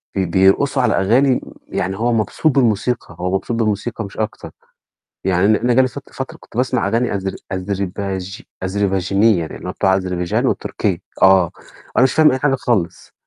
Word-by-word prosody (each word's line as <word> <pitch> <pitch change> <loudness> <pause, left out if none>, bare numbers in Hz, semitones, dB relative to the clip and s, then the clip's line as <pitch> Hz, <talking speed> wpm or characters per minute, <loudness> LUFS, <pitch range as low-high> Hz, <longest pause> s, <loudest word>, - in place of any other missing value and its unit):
بي 95 -1 +1
بيرقصوا 95 +10 +3
على - - +2
أغاني 120 +8 +3
امم، - - -12
يعني 95 +1 -2
هو 120 +2 +1
مبسوط 115 +8 +1
بالموسيقى، 115 -5 0
هو 90 +1 -1
مبسوط 115 +4 -2
بالموسيقى 110 0 -1
مش 100 - -12
أكتر. 110 -1 -4 0.7
يعني 95 +1 +2
أنا 110 - +3
أنا 120 -1 +2
جَه 130 - +5
لي 130 - +3
فت - - -11
فترة - - -6
كنت - - -16
باسمع 125 -4 +1
أغاني 115 +2 0
أذر 95 -1 -3 0.2
أذرباج 95 0 -4 0.2
أذرباجينية، 95 0 +1
اللي - - -8
هو - - -3
بتاع 95 0 +2
أذربيجان 90 -2 -1
وتركيا، - - -1 0.2
آه، 95 -3 +6 0.5
وأنا - - +5
مش 130 - +1
فاهم 155 -2 +5
أي 130 - 0
حاجة 140 0 +2
خالص. 105 -10 -2
100 Hz, 175 wpm, -19 LUFS, 95-120 Hz, 0.7 s, آه